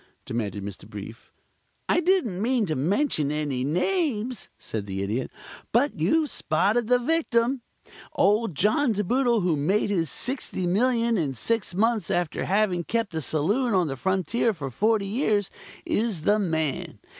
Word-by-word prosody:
demanded 105 -4 -3
Mr. 100 +1 -8
Brief. 105 +2 -9 0.6
"I - - +3
didn't 340 - +1
mean 240 0 +2
to 155 -4 -2
mention 155 - +1
any 145 -4 -1
names," 240 - -1
said 105 -2 -5
the 95 0 -3
Idiot. 110 +6 -2 0.4
"But 250 - +2
you've 295 - +2
spotted 210 +9 +1
the 250 +1 +5
victim. 250 -3 +1 0.5
Old 210 -3 +2
John 220 - +2
De 210 0 -1
Boodle, 240 +1 +2
who 175 -3 +2
made 190 +9 +1
his 165 -6 0
$60,000,000 230 - 0
in 140 -5 -1
six 220 - -1
months 220 -2 +1
after 175 -4 -1
having 190 -3 +1
kept 225 0 -2
a 160 - -2
saloon 200 - +1
on 180 -2 +3
the 135 - -3
frontier 190 - 0
for 140 -5 -5
forty 215 - +1
years, 210 -2 0 0.3
is 210 -8 -1
the 210 +5 +3
man. 160 -7 -2
200 Hz, 150 wpm, -25 LUFS, 155-235 Hz, 0.6 s, the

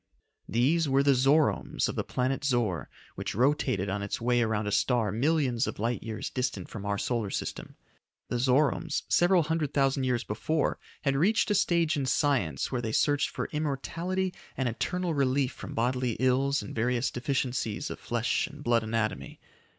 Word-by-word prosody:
These 145 +7 +2
were 135 +1 +3
the 140 0 +5
Zoromes 140 +4 +2
of - - -3
the - - -1
planet 130 +2 -1
Zor 115 - 0 0.2
which - - -5
rotated 125 -5 +1
on 100 +1 -2
its 100 - -3
way 120 +1 +2
around 110 -2 0
a 105 - -2
star 115 -2 +2
millions 130 0 +1
of - - -4
light 115 +3 -1
years 110 -2 -5
distant 125 -8 -2
from 100 -2 -6
our 100 0 0
solar 115 -2 -1
system. - - -5 0.5
The 120 - -2
Zoromes, 145 +5 +2
several 175 0 +4
hundred 155 -2 -2
thousand 135 -1 +2
years 125 -1 0
before, 145 +9 -1 0.2
had 140 -2 +1
reached 205 +8 +2
a - - +4
stage 170 -5 +2
in 135 -2 -1
science, 130 - +1
where 125 -2 -1
they 110 -2 -3
searched 145 +3 +2
for - - -4
immortality 165 +5 -2 0.2
and 130 - 0
eternal 175 +9 -1
relief 135 -1 +1
from - - -9
bodily 125 +1 0
ills 130 +2 +1
and 100 - -8
various 120 +2 0
deficiencies 125 -4 -2
of - - -7
flesh 120 +6 0
and 150 -2 -11
blood 120 -2 +3
anatomy. 110 0 -2
130 Hz, 175 wpm, -28 LUFS, 115-145 Hz, 0.5 s, the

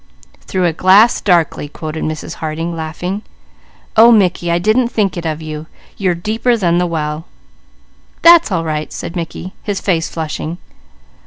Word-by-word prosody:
"'Through 185 -1 0
a 170 - +1
glass 195 +7 +5
darkly,'" 170 -5 +1
quoted 155 +1 -6
Mrs. 155 0 -5
Harding 165 +2 -3
laughing. 175 +5 -4 0.7
"Oh 230 +2 +8
Mickey, 185 -5 +2
I 170 - +2
didn't 215 +7 +2
think 210 -5 0
it 170 -2 -4
of 155 0 -4
you. 155 0 -6 0.3
You're 185 -3 0
deeper 225 +7 0
than 175 -4 +2
the 180 - +1
well." 155 -1 -3 1.0
"That's 335 -7 +7
all 170 -3 0
right," 155 -1 -3
said 170 - -6
Mickey, 175 +2 -5
his 205 -2 -3
face 170 -4 0
flushing. 160 +1 -4
175 Hz, 155 wpm, -16 LUFS, 160-200 Hz, 1.0 s, Oh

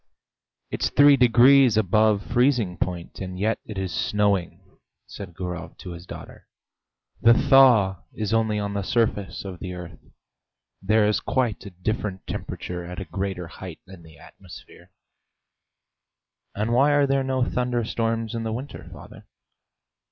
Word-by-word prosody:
"It's - - -1
three 145 0 +6
degrees 125 -1 +5
above 105 0 +2
freezing 120 -6 +1
point, 90 0 -4
and 95 -1 -6
yet 110 +4 0
it 105 - -7
is 95 -3 -3
snowing," 100 -4 0 0.5
said 90 -4 -10
Gurov 90 -2 -6
to 90 - -9
his 85 +1 -10
daughter. - - -11 0.7
"The 115 0 +6
thaw 125 -10 +5
is 110 0 -3
only 110 -1 +1
on 100 -1 -3
the 100 - -2
surface 100 -3 -1
of 95 -3 -7
the 90 0 -6
earth; 85 -3 -9 0.8
there 105 +2 +3
is 105 - +1
quite 125 -6 -1
a - - -7
different 95 +1 -4
temperature 90 -1 -6
at 90 +2 -7
a 95 - -6
greater 95 0 -4
height 85 0 -10
in 95 -2 -13
the 80 -2 -16
atmosphere." - - -15 1.7
"And 110 +3 -1
why 140 +4 +4
are 145 -1 +4
there 135 0 +1
no 130 -1 0
thunderstorms 115 -2 -2
in 115 - -3
the 110 0 -3
winter, 130 +5 -7
father?" - - -13
105 Hz, 145 wpm, -24 LUFS, 90-120 Hz, 1.7 s, three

